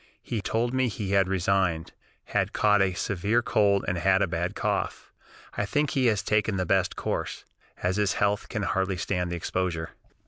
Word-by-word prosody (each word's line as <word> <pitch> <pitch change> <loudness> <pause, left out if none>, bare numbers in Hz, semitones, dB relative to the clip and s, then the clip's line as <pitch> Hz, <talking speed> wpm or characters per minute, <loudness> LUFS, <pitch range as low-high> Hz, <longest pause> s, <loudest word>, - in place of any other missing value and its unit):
He 115 -4 -3
told 115 +5 -1
me 130 -1 +2
he 100 -3 -4
had 100 -2 +4
resigned, 95 -3 0 0.3
had - - -1
caught 105 -1 +4
a 95 -1 +2
severe 100 +6 0
cold 100 -3 +2
and 85 0 0
had 95 +1 +3
a - - +1
bad 85 +1 -2
cough. - - -2 0.4
I - - -1
think 145 +8 0
he 130 -2 +2
has 105 -3 +1
taken 105 -1 +1
the 95 - 0
best - - +1
course, - - -3 0.4
as 90 +2 +1
his 105 -3 +2
health 100 +1 0
can 110 -3 -2
hardly 95 -1 0
stand 90 -1 -2
the - - -1
exposure." 85 -1 -2
100 Hz, 185 wpm, -27 LUFS, 90-105 Hz, 0.4 s, had